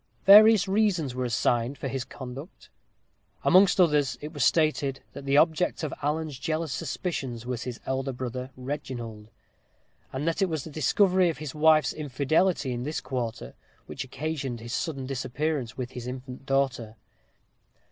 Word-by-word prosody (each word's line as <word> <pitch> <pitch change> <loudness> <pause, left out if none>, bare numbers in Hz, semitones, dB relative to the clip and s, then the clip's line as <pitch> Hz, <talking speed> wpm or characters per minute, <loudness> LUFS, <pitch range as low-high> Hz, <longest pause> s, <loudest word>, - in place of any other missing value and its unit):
Various 210 0 +8
reasons 190 - +1
were 130 0 -2
assigned 120 +2 0
for - - -4
his 130 -1 -3
conduct. 135 +4 -10 0.7
Amongst 190 +1 +5
others, 150 -6 +3
it 150 +2 -8
was 145 - -1
stated 150 -4 +1
that 140 - -9
the 140 +1 +3
object 165 +2 +2
of 155 - -2
Alan's 150 -1 -2
jealous 155 -1 -2
suspicions 130 -4 -4
was 125 -2 -4
his 125 -2 -5
elder 130 +1 -2
brother, 125 0 -5
Reginald; 120 -5 -6 0.8
and 140 +4 -3
that 165 - 0
it 190 - +2
was 155 -4 -2
the 160 - -9
discovery 180 +5 +3
of 165 - -3
his 150 -3 -6
wife's 155 0 +4
infidelity 150 +2 0
in 120 - -4
this 150 +5 -3
quarter 120 - -4 0.3
which - - -6
occasioned 140 -2 -4
his 120 +1 -7
sudden 140 -5 -3
disappearance 135 0 -3
with 125 -1 -4
his 125 0 -7
infant 130 +1 -8
daughter. 135 -5 0
140 Hz, 155 wpm, -27 LUFS, 125-160 Hz, 0.8 s, Various